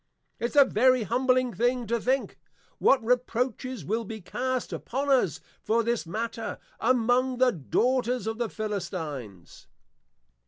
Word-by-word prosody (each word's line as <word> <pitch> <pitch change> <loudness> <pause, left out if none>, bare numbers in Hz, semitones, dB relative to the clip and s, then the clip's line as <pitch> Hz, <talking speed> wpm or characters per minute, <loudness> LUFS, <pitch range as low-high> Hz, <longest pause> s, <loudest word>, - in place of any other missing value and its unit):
It's 235 +5 -3
a 285 -1 +8
very 255 0 +3
humbling 255 +2 +1
thing 245 +1 0
to 230 +1 -1
think, 260 +3 -1 0.4
what 255 -4 +4
reproaches 250 - -1
will 225 +7 -1
be 220 +1 -7
cast 255 +6 -3
upon 275 +3 -2
us, 245 - +2 0.2
for 230 +1 +1
this 235 -5 -1
matter, 225 +5 -4 0.2
among 250 +2 +2
The 255 0 +4
Daughters 245 - 0
of 225 +1 -3
the 235 -2 -1
Philistines. 160 - -6
235 Hz, 130 wpm, -27 LUFS, 215-255 Hz, 0.4 s, a